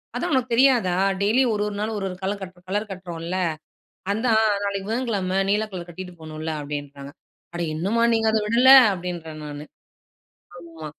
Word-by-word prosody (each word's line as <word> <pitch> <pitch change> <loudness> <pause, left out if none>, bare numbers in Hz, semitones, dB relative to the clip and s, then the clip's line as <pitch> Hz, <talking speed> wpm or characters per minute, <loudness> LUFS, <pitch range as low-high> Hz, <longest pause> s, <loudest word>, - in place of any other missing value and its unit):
"அதான் 350 - -2
உனக்கு 255 -2 +1
தெரியாதா? 240 -8 +4 0.3
டெய்லியும் 230 +4 +3
1 205 - -1
1 205 - -6
நாள் 220 +1 -2
1 195 - -3
1 180 - -8
கலர் 200 +1 -2
கட் 185 -1 -9
கலர் 205 +2 -2
கட்டுறோம்ல்ல, 175 -1 -5 0.8
அதான் 220 +1 +2 0.2
நாளைக்கு 200 -1 -3
புதன்கிழமை 210 -6 -1
நீல 210 +2 +1
கலர் 175 -2 -7
கட்டிட்டு 180 +1 -8
போணும்ல்ல." 155 0 -5
அப்படீன்றாங்க. 145 -1 -7 0.4
"அட 175 - -2
இன்னுமா 205 +8 +1
நீங்க 225 0 +2
அத 220 - +2
விடல?" 240 +4 +4 0.2
அப்படீன்றேன் 170 -4 -6
நானு. 145 0 -7 0.9
ஆமா. 165 -2 -11
190 Hz, 160 wpm, -23 LUFS, 170-220 Hz, 0.9 s, தெரியாதா